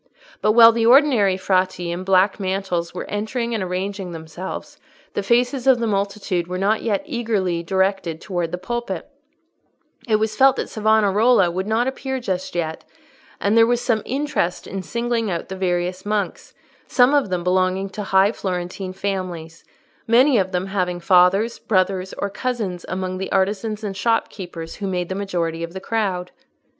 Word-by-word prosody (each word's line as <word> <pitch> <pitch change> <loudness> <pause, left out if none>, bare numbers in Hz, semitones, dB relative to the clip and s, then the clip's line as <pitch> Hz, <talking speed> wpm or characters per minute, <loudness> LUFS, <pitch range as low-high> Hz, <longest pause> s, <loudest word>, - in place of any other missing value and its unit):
But 215 - +3
while 230 0 +9
the 230 0 +1
ordinary 240 -8 +5
Frati 185 -2 0
in 175 +2 -4
black 190 +2 +3
mantles 190 -3 -2
were 180 - -6
entering 230 +3 -2
and 220 - -1
arranging 185 0 -3
themselves, 165 +3 -7 0.3
the - - -1
faces 245 +5 +1
of 260 -2 +6
the 235 - -1
multitude 200 -4 -1
were 180 +1 -4
not 205 +3 +1
yet 210 -4 -1
eagerly 215 - -1
directed 190 -2 0
towards 175 -4 -3
the 180 - -2
pulpit: 195 -2 -4 1.0
it 220 - +3
was 215 0 0
felt 270 +2 +5
that - - -4
Savonarola 215 -2 +3
would 185 +3 -3
not 225 +3 +1
appear 265 0 -3
just 185 -7 -3
yet, 160 -2 -3 0.6
and 205 +2 +1
there 225 0 +6
was 240 0 +2
some 230 -3 0
interest 270 -10 -2
in 195 - -5
singling 235 +3 -2
out 170 -2 -4
the 190 - -5
various 180 0 -1
monks, 205 -1 -3 0.3
some 250 +2 +4
of 285 -8 +2
them 180 -1 -2
belonging 185 +1 +1
to 210 - -5
high 195 0 +3
Florentine 185 -2 -4
families, 185 -4 -4 0.4
many 245 +2 +5
of 190 -1 -1
them 180 0 -1
having 180 -3 -2
fathers, 185 +5 +3
brothers, 190 -1 0
or 200 - -2
cousins 215 -8 -3
among 185 0 -3
the 190 - -4
artisans 205 +3 0
and 200 -2 -4
shopkeepers 185 -6 -2
who 200 - -4
made 180 -2 -2
the - - -2
majority 175 -4 -2
of 170 0 -5
the 190 - -5
crowd. 190 -4 -2
195 Hz, 170 wpm, -21 LUFS, 180-225 Hz, 1.0 s, while